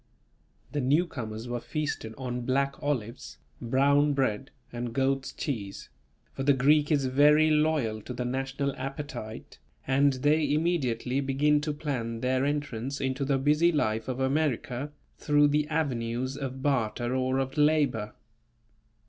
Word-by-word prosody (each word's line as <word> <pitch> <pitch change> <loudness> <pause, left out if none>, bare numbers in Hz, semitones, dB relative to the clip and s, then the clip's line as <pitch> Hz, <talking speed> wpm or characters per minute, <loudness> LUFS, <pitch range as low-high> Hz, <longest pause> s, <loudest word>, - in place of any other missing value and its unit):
The 145 - -1
newcomers 125 -6 -1
were 120 0 -3
feasted 130 -5 -4
on 125 -2 -4
black 135 +3 0
olives, 130 -6 -3 0.2
brown 140 +4 +3
bread 135 -2 -1 0.2
and 120 -1 -4
goat's 135 +1 0
cheese; 105 -9 -5 0.4
for - - -5
the 140 +1 +4
Greek 150 +4 +3
is 140 -3 +2
very 150 +4 +5
loyal 150 -8 +1
to 125 - -7
the 125 - -3
national 135 +2 -2
appetite, 135 -4 -7 0.3
and 135 +1 +3
they 145 +3 +2
immediately 140 -6 0
begin 145 +2 +2
to 150 0 -2
plan 125 -6 -3
their 130 +1 +1
entrance 140 -3 -3
into 130 +1 -1
the 135 0 +1
busy 150 +5 +3
life 110 -8 0
of 130 0 -3
America, 135 -1 -1 0.3
through 145 0 +4
the 150 +1 +1
avenues 130 -4 -2
of 135 -1 -5
barter 120 -3 0
or 130 0 0
of 135 0 -2
labour. 145 -8 +2
135 Hz, 140 wpm, -28 LUFS, 125-145 Hz, 0.4 s, very